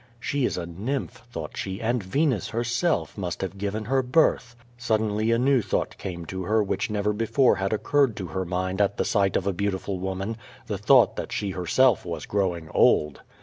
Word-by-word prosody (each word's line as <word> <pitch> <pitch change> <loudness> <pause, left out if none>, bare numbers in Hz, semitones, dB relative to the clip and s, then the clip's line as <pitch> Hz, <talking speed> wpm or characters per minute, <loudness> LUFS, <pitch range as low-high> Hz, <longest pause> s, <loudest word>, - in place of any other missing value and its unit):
She 140 0 -1
is - - -1
a 85 - -3
nymph, 115 +8 -4
thought 80 -7 -6
she, 95 0 -4
and 120 +1 0
Venus, 125 - 0
herself, 120 +8 0
must 90 -3 -3
have 95 0 -5
given 105 +2 -3
her 135 +3 +2
birth. 125 -3 +2 0.2
Suddenly 110 -2 0
a 115 - +3
new 130 +1 +3
thought - - -2
came 85 -3 -5
to 95 +3 -5
her, 110 +2 +2
which 100 - -2
never 105 0 0
before 115 +2 +2
had 95 0 -1
occurred 130 +2 +2
to 95 - -4
her 95 +2 -3
mind 95 +2 -2
at 100 0 +1
right 100 -3 +2
of 95 - 0
a 100 - +1
beautiful 95 0 -2
woman, 95 +4 -3 0.3
the - - -4
thought - - +5
that - - -4
she 100 -2 -2
herself 95 +7 +2
was 85 -2 -5
growing 90 -5 -1
old. 75 -2 +3
105 Hz, 190 wpm, -25 LUFS, 95-120 Hz, 0.3 s, thought